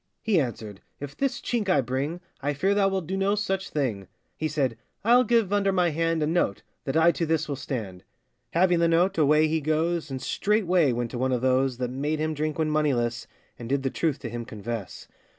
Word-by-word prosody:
He 215 -6 +3
answered, 110 -6 -5 0.2
'If 145 0 -7
this 275 -2 -1
chink 225 -5 -2
I 165 - +4
bring, 135 +8 -3 0.2
I 145 +1 -1
fear 190 +8 +2
thou 200 -1 +3
wilt 190 -3 -2
do 190 +4 -3
no 195 +1 +1
such 195 -2 -2
thing. 115 -10 -2 0.3
He 155 - -2
said, 140 -6 -1 0.3
'I'll 245 +2 +6
give 225 -4 +2
under 200 -1 +2
my 180 -3 +2
hand, 165 0 0
A - - +2
note, 155 - 0 0.2
that 135 +2 0
I 165 +1 +6
to 170 - -3
this 160 -1 0
will 145 - -2
stand.' 105 -10 -5 0.5
Having 175 0 +3
the 170 - +4
note, 170 +2 +2
away 150 +1 +4
he 160 0 0
goes, 160 +2 0
And 135 -1 -4
straightway 185 - +2
went 120 -1 -2
to 120 - -4
one 130 +1 +1
of 125 -2 0
those 130 0 +2
That 125 -1 -3
made 145 +4 -1
him 155 +1 -1
drink 155 0 -2
when 155 -1 0
moneyless, 125 -6 0 0.3
And 120 -1 -7
did 135 0 0
the 135 - -1
truth 155 -4 0
to 120 - -5
him 120 +1 -5
confess. 115 -2 -6
155 Hz, 220 wpm, -26 LUFS, 130-175 Hz, 0.5 s, I'll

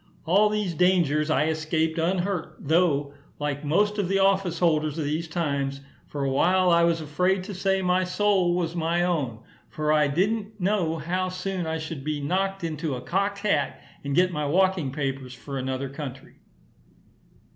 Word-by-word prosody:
All 200 +6 +4
these 210 -4 -1
dangers 165 -4 +2
I 150 -1 +2
escaped 160 +1 0
unhurt, 180 +1 -1
though, 145 -3 +1 0.2
like 145 0 -3
most 205 +8 +1
of 195 - 0
the 195 +1 +1
office 195 -3 +2
holders 155 -3 +1
of 160 - -1
these 155 +3 -2
times, 140 -4 -2 0.3
for 145 -1 -4
a 135 - +1
while 180 +6 +3
I 170 0 +5
was 170 -1 +2
afraid 180 +5 0
to 200 +2 -7
say 190 0 0
my 180 +1 +2
soul 185 -1 +2
was 170 -1 -2
my 170 +1 +1
own; 140 -11 -1 0.3
for 155 0 0
I 150 -1 +4
didn't 210 +7 -1
know 180 -4 0
how 180 +4 -2
soon 185 -1 -3
I 160 0 -1
should 155 -3 -6
be 150 0 -2
knocked 190 +6 -1
into 155 -3 -2
a 125 - -6
cocked 200 +6 -1
hat, 150 -9 +1 0.2
and 140 -1 -2
get 180 +2 +4
my 150 -2 -1
walking 185 -3 +2
papers 135 -2 -4
for 135 +2 -6
another 130 +1 -3
country. 135 -1 -8
165 Hz, 175 wpm, -25 LUFS, 150-185 Hz, 0.3 s, I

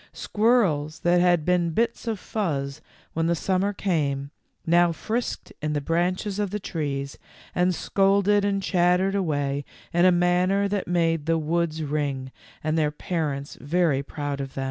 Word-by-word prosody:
Squirrels 195 -10 +1
that 175 0 +3
had 175 -3 +3
been 180 -1 +2
bits 235 +1 0
of 225 -2 -1
fuzz 150 -10 -3 0.3
when 165 0 0
the 170 - +2
summer 190 +4 0
came, 145 -8 -1 0.3
now 175 +1 +4
frisked 225 +9 -3
in 150 0 -1
the 145 - 0
branches 180 +6 -1
of 205 -2 0
the 210 +2 -3
trees 140 -7 -4 0.3
and 180 0 +2
scolded 200 +2 +2
and 200 -1 0
chattered 180 +1 +2
away 145 -7 -1 0.3
in 175 +1 +3
a 185 - +7
manner 180 +3 +2
that 200 0 -2
made 165 -3 +1
the 165 0 +3
woods 160 0 -1
ring, 140 -3 -2 0.3
and 155 +1 +1
their 150 -1 +2
parents 150 -3 -3
very 155 -2 +1
proud 145 0 -4
of 135 -1 -7
them. - - -4
170 Hz, 160 wpm, -25 LUFS, 150-190 Hz, 0.3 s, a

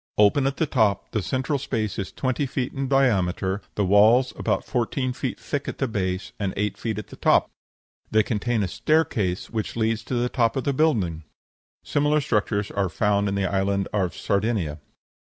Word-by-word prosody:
Open 105 +7 +4
at 135 - -2
the 160 - +2
top; 110 -8 +1
the 110 - 0
central 130 - -1
space 110 -6 -2
is 95 - -4
twenty 130 +2 -1
feet 130 -1 -3
in 135 0 -2
diameter, 100 -7 +1
the 100 - +1
walls 110 +7 +5
about - - -1
fourteen 125 +1 -1
feet 130 0 -4
thick 145 -1 -3
at - - -4
the 135 - 0
base, 95 -4 -2
and 100 -2 -2
eight 105 -1 -1
feet 110 0 -3
at 105 - -6
the - - -10
top. - - +3 0.6
They 110 0 +4
contain 110 +1 0
a - - 0
staircase, 105 - 0
which 110 -2 -3
leads 115 0 0
to 125 - -3
the 120 0 +1
top 120 -3 +1
of 135 - -1
the 140 - 0
building. 105 - +1 0.6
Similar 150 +1 +2
structures 105 -6 0
are 100 -2 0
found 100 +1 +1
in 100 - -2
the 100 -1 0
Island 100 +1 0
of 95 -4 0
Sardinia. 100 -7 -1
110 Hz, 190 wpm, -24 LUFS, 100-130 Hz, 0.6 s, walls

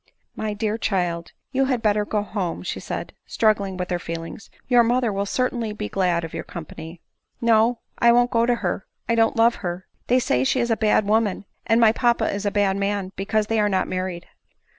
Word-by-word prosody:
" - - -45
My 215 -1 -3
dear 215 +1 -2
child, 175 -5 -1 0.2
you 270 +1 +2
had 255 -3 -1
better 210 -1 +2
go 210 0 -1
home," 195 -5 -4
said - - -4
she, - - -26
struggling 205 -4 +1
with 180 0 -4
her 175 - 0
feelings; 165 +3 -7
" - - -35
your 245 -2 +5
mother 240 -1 +1
will 200 +1 -2
certain 250 +2 0
ly 220 -2 -3
be 210 0 -5
glad 180 -3 +1
of 165 - -7
your - - -4
company." 165 0 -9 0.2
" - - -50
No, 225 +1 +4 0.2
I 235 - +6
won't 245 +1 +3
go 230 0 +2
to 245 - +3
her; 175 +2 -2 0.2
I 230 - +2
don't 225 -1 +2
love 230 +1 +4
her; 180 0 -4 0.2
they 250 - +4
say 130 - +1
she 255 - +1
is 235 -1 0
a - - +4
bad 215 -1 +2
woman, 210 -2 +1 0.2
and 225 - +4
my 225 -2 +6
papa 235 -2 +1
a 205 - +1
bad 200 -1 +1
man, 200 -1 -1
because 215 +2 0
they 225 +1 0
are 210 0 +3
not 190 -2 0
married." 185 -2 -4
210 Hz, 225 wpm, -23 LUFS, 185-230 Hz, 0.2 s, I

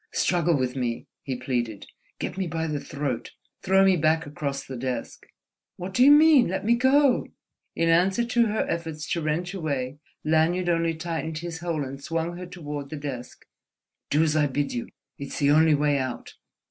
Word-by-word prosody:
"Struggle 170 -3 +2
with 130 -1 -1
me!" 120 -3 -2 0.2
he 130 - -4
pleaded—"get 120 -4 -5
me 190 -1 -2
by 160 0 -2
the 150 -2 -2
throat, 140 -5 -4 0.3
throw 190 0 +4
me 190 -1 +5
back 160 +1 +2
across 140 -2 -4
the 130 - -7
desk—" 125 +1 -5 0.5
"What 185 +1 -6
do 250 - +4
you 275 - +8
mean? 295 -3 +7
Let 190 +2 -3
me 230 - +4
go!" 260 +2 +3 0.5
In 165 - +1
answer 185 +7 +3
to 235 -1 +2
her 215 +1 0
efforts 160 -3 -4
to 170 - 0
wrench 165 +4 -2
away, 145 -6 -3 0.2
Lanyard 165 +3 +2
only 165 -1 +1
tightened 160 -1 -4
his 165 0 -5
hold 165 -3 -2
and 135 +1 -7
swung 165 +1 -2
her 180 0 -7
toward 150 -5 -6
the 155 - -5
desk. 135 -4 -7 0.6
"Do 150 +3 +3
as 155 -1 +1
I 150 -1 +3
bid 140 +1 -2
you! 120 - -4 0.3
It's 140 -1 -6
the 145 -1 +3
only 155 0 +5
way 145 -1 +2
out. 130 -2 -5
160 Hz, 185 wpm, -25 LUFS, 140-175 Hz, 0.6 s, you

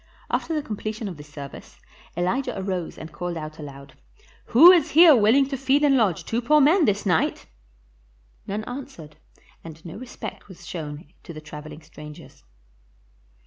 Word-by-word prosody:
After 325 - -1
the 300 - -2
completion 215 0 -5
of 180 -5 -7
the 150 - -10
service, 145 -2 -11 0.4
Elijah 195 +6 -1
arose 185 -3 -4
and 160 - -9
called 175 -1 -5
out 155 0 -8
aloud, 140 -2 -10 0.5
"Who 320 +10 +8
is 335 -4 +3
here 325 -1 +8
willing 240 +5 +4
to 275 - -3
feed 270 +3 +1
and 285 -2 +4
lodge 210 -9 +1
two 230 +2 -1
poor 300 +6 +4
men 310 +5 +4
this 205 -2 0
night?" 175 -5 0 1.0
None 210 +2 -3
answered, 245 - -9 0.5
and 160 0 -12
no 165 - -8
respect 240 -3 -9
was 175 -3 -14
shown 150 -2 -8
to 170 - -10
the 155 - -8
traveling 155 0 -10
strangers. 150 -1 -13
195 Hz, 160 wpm, -24 LUFS, -, 1.0 s, Who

